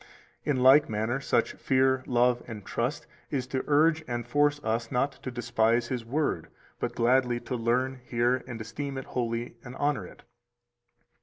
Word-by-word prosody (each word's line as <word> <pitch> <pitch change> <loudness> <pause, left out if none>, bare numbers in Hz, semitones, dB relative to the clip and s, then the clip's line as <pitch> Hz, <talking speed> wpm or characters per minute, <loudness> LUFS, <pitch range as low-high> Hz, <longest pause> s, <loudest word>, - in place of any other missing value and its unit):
In 145 -3 0
like 140 +3 +7
manner 110 +4 -1
such 135 - +1
fear, 130 -1 +2
love, 125 0 +3
and 110 -4 -8
trust - - -2 0.2
is 130 -3 -1
to 130 0 -2
urge 155 +2 +4
and 120 -1 -3
force 145 +3 +2
us 115 +1 -1
not 135 +3 +1
to - - -4
despise 120 -1 +1
His 125 -3 -2
Word, 145 +6 -1 0.3
but - - -3
gladly 125 0 +3
to 130 - -4
learn, 125 +3 0
hear, 125 +1 +1
and 120 -3 -6
esteem 135 +5 -5
it 130 - -5
holy, 120 -1 -3
and 125 0 -9
honor 145 0 0
it. - - -16
125 Hz, 165 wpm, -28 LUFS, 120-135 Hz, 0.3 s, like